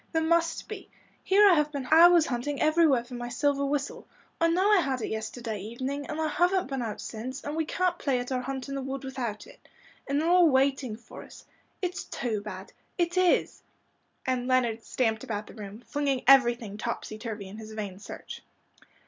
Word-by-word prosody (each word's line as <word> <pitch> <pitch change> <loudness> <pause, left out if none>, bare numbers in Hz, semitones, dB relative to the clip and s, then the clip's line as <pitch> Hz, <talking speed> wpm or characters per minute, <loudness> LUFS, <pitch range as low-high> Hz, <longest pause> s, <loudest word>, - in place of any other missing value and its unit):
There 320 0 +2
must 330 0 +1
be. - - -8 0.3
Here 405 +2 +6
have 300 -3 +3
I - - -24
been 275 -3 -4
hours 340 0 +8
hunting 275 +1 -3
everywhere 310 -5 +4
for 240 - -13
my 240 0 -5
silver 280 +3 +1
whistle. 280 0 -2 0.3
I 330 - +4
know 370 +5 +3
I 415 - +6
had 270 -6 -1
it - - -2
yesterday 220 0 -4
evening, 260 +7 -4
and 305 - -4
I 315 - +1
haven't 355 +4 +2
been 270 -2 -2
out 220 -3 -4
since, 255 +5 -6
and 290 - -4
we 320 0 0
can't 360 +1 0
play 270 -3 +1
at 245 +1 -4
our 255 -1 0
hunt 265 0 -5
in 275 - -5
the 275 - -3
wood 270 +1 -5
without 245 -5 -4
it. - - -18 0.4
And 280 +1 +1
they're 320 - 0
all 350 -1 +6
waiting 265 -3 +1
for 230 +1 -12
us. - - -14 0.4
It's 360 0 -3
too 220 -4 -3
bad 195 -2 -8 0.2
it 345 0 0
is," 365 -1 +2 0.6
and 255 -1 -1
Leonard 240 -3 +1
stamped 225 -2 -1
about 215 -5 -4
the - - -13
room, 210 +1 -9
flinging 280 -3 -1
everything 240 -6 +4
topsy 215 -2 -4
turvy 215 -4 -6
in 205 +3 -9
his 220 0 -9
vain 200 -3 -5
search. - - -9
265 Hz, 200 wpm, -28 LUFS, 230-310 Hz, 0.6 s, hours